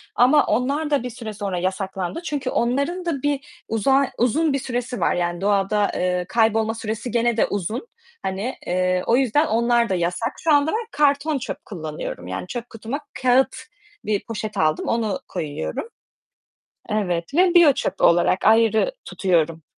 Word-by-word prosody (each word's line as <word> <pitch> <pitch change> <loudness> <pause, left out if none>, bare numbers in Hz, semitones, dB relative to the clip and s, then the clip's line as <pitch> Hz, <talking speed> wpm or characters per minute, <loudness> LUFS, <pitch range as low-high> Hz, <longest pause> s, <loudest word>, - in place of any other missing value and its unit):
ama 260 +5 +5
onlar 285 +5 0
da 285 -4 +1
bir 250 - -4
süre 225 -2 -7
sonra 200 -3 -3
yasaklandı 190 - -3
çünkü 285 -6 -2
onların 280 +11 0
da 290 -6 -2
bir 290 +5 -3
uzar 265 +5 +2
uzun 285 +5 +2
bir 275 - 0
süresi 245 -2 -3
var, - - +2
yani 175 0 -2
doğada, 205 +1 +2
eee, 180 0 0
kaybolma 225 -1 +2
süresi 225 +1 -4
gene 235 0 +1
de - - +4
uzun, 210 - -3 0.3
hani, 195 +7 -3
eee, 185 0 +1
o 235 - +4
yüzden 270 +4 +2
onlar 235 -2 +2
da 190 - +1
yasak. 180 +8 -1
Şu 320 -2 +4
anda 290 +2 +3
ben 450 +1 -2
karton 290 +1 +2
çöp 255 - -6
kullanıyorum, 155 - -6
yani 95 - -5
çöp 240 +3 -6
kutuma 230 +5 -5 0.2
kâğıt 255 +1 +3 0.5
bir 210 -2 0
poşet 215 -2 -5
aldım, 155 -1 +1
onu 220 -4 0
koyuyorum. 155 - -4 1.0
Evet 180 -5 -1
ve 355 +2 +4
biyo 335 -5 +7
çöpü 190 -6 -3
olarak 175 +2 +4
ayrı 225 - +4
tutuyorum 165 -4 0
230 Hz, 160 wpm, -22 LUFS, 190-275 Hz, 1.0 s, biyo